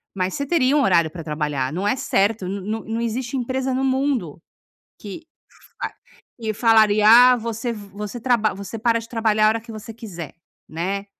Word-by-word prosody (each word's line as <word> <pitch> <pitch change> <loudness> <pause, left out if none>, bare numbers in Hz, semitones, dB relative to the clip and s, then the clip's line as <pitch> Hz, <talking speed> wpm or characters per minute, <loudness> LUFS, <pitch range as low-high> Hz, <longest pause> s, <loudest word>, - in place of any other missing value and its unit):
Mas 185 -1 -1
você 280 - -2
teria 280 -3 +2
um - - +3
horário 170 -7 +3
pra 170 -1 -8
trabalhar. 150 -4 -2
Não 190 +4 -2
é 210 - +2
certo, 205 -3 0
n 195 +1 -4
não 215 +3 -4
não 225 +1 -3
existe 235 +3 -3
empresa 260 +1 -2
no 265 - -1
mundo 260 - -1 0.6
que 205 +8 -8 0.6
fa - - -3 0.5
que 220 -1 -2
falaria: 215 -2 +4
"Ah, 250 +2 +8
você 230 +1 -4
v 205 -3 -10
você 210 +3 -6
traba 225 -3 +2
você 200 +3 -7
para 230 +1 +2
de 230 - -12
trabalhar 220 -2 +1
a - - +6
hora 225 +1 -1
que 230 +1 -13
você 220 +1 -8
quiser", 175 - -8 0.3
né. 190 +5 -3
220 Hz, 195 wpm, -22 LUFS, 195-240 Hz, 0.6 s, Ah